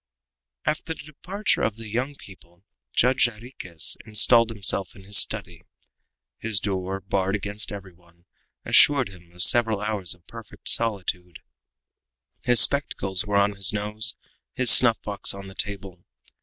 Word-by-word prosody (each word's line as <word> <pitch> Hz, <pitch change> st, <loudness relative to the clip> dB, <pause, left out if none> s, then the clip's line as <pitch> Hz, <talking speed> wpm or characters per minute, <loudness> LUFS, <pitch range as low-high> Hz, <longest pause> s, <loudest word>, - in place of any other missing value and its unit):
After 160 Hz, +1 st, -2 dB
the -, -, -11 dB
departure 180 Hz, +7 st, -3 dB
of 110 Hz, -, 0 dB
the 115 Hz, 0 st, -10 dB
young 125 Hz, +7 st, -3 dB
people, 85 Hz, -5 st, -17 dB, 0.3 s
Judge 125 Hz, +1 st, +3 dB
Jarriquez 105 Hz, -8 st, -4 dB
installed 115 Hz, +2 st, +3 dB
himself 100 Hz, -3 st, -2 dB
in 95 Hz, -, -14 dB
his 100 Hz, +2 st, -5 dB
study. 85 Hz, -1 st, -2 dB, 0.8 s
His 110 Hz, -4 st, +2 dB
door, 95 Hz, 0 st, -3 dB
barred 95 Hz, 0 st, -1 dB
against 105 Hz, +1 st, -3 dB
every 100 Hz, -2 st, -9 dB
one, 85 Hz, 0 st, -27 dB, 0.4 s
assured 140 Hz, -6 st, +4 dB
him 90 Hz, -3 st, -17 dB
of 90 Hz, 0 st, +3 dB
several 110 Hz, +1 st, +4 dB
hours 105 Hz, -4 st, -2 dB
of 85 Hz, -1 st, -31 dB
perfect 115 Hz, -1 st, -12 dB
solitude. 90 Hz, -6 st, -2 dB, 1.1 s
His 120 Hz, -2 st, +5 dB
spectacles 105 Hz, -8 st, +1 dB
were 100 Hz, -1 st, +1 dB
on 100 Hz, 0 st, +3 dB
his 100 Hz, -1 st, -2 dB
nose, 105 Hz, +1 st, -2 dB, 0.4 s
his 125 Hz, -3 st, +4 dB
snuff 120 Hz, -3 st, +7 dB
box 100 Hz, -1 st, -1 dB
on 100 Hz, 0 st, -9 dB
the 95 Hz, -, -11 dB
table. 95 Hz, -3 st, -5 dB
100 Hz, 145 wpm, -24 LUFS, 95-115 Hz, 1.1 s, snuff